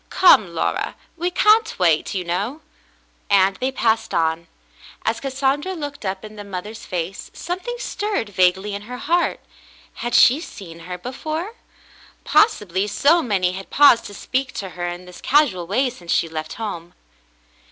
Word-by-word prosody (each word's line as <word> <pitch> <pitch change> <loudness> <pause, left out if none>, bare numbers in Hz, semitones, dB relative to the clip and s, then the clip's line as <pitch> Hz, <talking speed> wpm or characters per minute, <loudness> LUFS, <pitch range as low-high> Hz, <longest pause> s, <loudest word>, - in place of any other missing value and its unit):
"Come, 210 - +5
Laura, - - -1 0.2
we 345 +1 -1
can't 430 +5 +3
wait, 170 0 +2
you 185 - -1
know," 200 - -3 0.7
and 195 0 +4
they 260 +4 -1
passed 225 -3 0
on. 165 0 0 0.6
As 225 +1 0
Cassandra 275 +5 -1
looked 290 - -6
up 190 +2 -4
in 215 0 -11
the 205 - -7
mother's 200 +3 -7
face, 180 +1 -4
something 375 +8 -4
stirred 415 - -3
vaguely 190 +1 +2
in 200 - -4
her 250 - -5
heart. 335 +6 0 0.6
Had 240 0 -1
she 270 +6 +6
seen 170 - -10
her 180 - -4
before? 310 - -5 0.7
Possibly, 205 - +2
so 300 - +3
many 190 - +1
had 190 +1 -8
paused 285 -5 +6
to 205 - -9
speak 260 +3 -2
to 195 - -5
her 175 0 -5
in 175 +1 -6
this 180 0 -12
casual 255 - +2
way 250 +7 +1
since 175 -8 -8
she - - +2
left 155 -1 -5
home. 175 -6 -6
210 Hz, 160 wpm, -21 LUFS, 180-285 Hz, 0.7 s, she